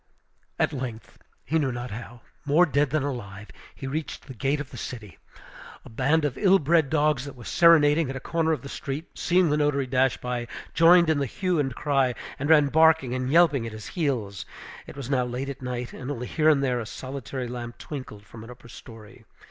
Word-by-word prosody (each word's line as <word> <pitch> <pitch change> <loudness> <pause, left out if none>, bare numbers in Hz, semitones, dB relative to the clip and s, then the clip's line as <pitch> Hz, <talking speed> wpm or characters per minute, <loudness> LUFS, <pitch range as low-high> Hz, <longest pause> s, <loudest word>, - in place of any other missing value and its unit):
At - - +1
length, 125 -5 -7 0.3
he 160 - +1
knew 135 -4 0
not 120 0 -6
how, 120 +2 -9 0.2
more 150 +5 +4
dead 145 -2 +1
than 155 0 0
alive, 105 -7 -6 0.3
he - - -8
reached 150 +3 -5
the 130 - -9
gate 135 +4 -1
of 145 -2 -7
the - - -10
city. 105 -9 -8 0.7
A - - -12
band 150 +7 +1
of 140 - -3
ill 195 -2 +5
bred 160 -2 +2
dogs, 150 -4 +1
that 140 - -9
were 120 - -12
serenading 160 -3 +5
at 135 - -4
a - - -4
corner 160 +3 -1
of 150 -5 -2
the - - -7
street, 140 +3 -6
seeing 180 -2 +2
the 150 - +2
notary 145 -2 +1
dash 130 0 +1
by, 125 -1 -4 0.3
joined 170 +1 +6
in 150 - +1
the 140 - -1
hue 180 - -1
and 135 -4 -1
cry, 135 -4 +1 0.2
and 140 +2 -2
ran 150 -3 +6
barking 160 -4 +4
and 130 0 -2
yelping 150 -7 +4
at 110 - -8
his 110 -1 -9
heels. 120 - -2 0.4
It - - -11
was 135 -4 -6
now 130 -2 +2
late 125 +3 -4
at 140 -1 -7
night, 125 -1 -5
and 125 - -7
only 125 -4 -4
here 155 +4 +2
and 140 -3 +3
there 125 -2 0
a 115 - -5
solitary 130 0 -6
lamp 120 -1 -7
twinkled 120 -8 -8
from 110 +1 -12
an 115 - -12
upper 120 -1 -13
story. 110 -2 -13
135 Hz, 215 wpm, -25 LUFS, 125-150 Hz, 0.7 s, joined